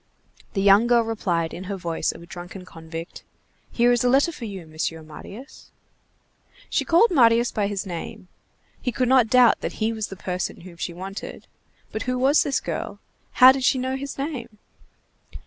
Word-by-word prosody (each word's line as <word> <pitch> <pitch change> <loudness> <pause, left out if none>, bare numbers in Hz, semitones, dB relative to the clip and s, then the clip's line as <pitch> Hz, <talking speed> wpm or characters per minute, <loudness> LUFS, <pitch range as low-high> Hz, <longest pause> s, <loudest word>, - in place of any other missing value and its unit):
The 195 - 0
young 200 +4 +6
girl 240 -1 +4
replied 180 -7 -2
in 185 - -7
her 200 +1 -4
voice 170 -3 -2
of 170 - -12
a - - -11
drunken 180 +2 -9
convict:— 165 0 -9 0.5
"Here 240 0 +3
is 240 -1 +2
a 250 - +3
letter 275 +6 +3
for 270 -7 -8
you, 195 -5 -7
Monsieur 160 +1 -4
Marius." 200 - -12 1.0
She - - +1
called 350 +7 +4
Marius 235 -5 +4
by 205 -2 0
his 205 0 -3
name; 180 0 -7 0.5
he 250 - -1
could 255 +1 0
not 255 -2 +5
doubt 250 0 +5
that - - -3
he 220 +1 -1
was 220 -2 -3
the 195 - -9
person 180 -1 -4
whom 175 -1 -12
she 170 - -4
wanted; 190 +3 -8 0.5
but 220 - -4
who 255 - 0
was 270 +4 +4
this 280 - 0
girl? - - -5 0.3
How 255 0 +9
did 265 0 -2
she 260 - +3
know 260 +1 -2
his 275 +1 -6
name? 270 -6 -5
220 Hz, 185 wpm, -24 LUFS, 180-255 Hz, 1.0 s, How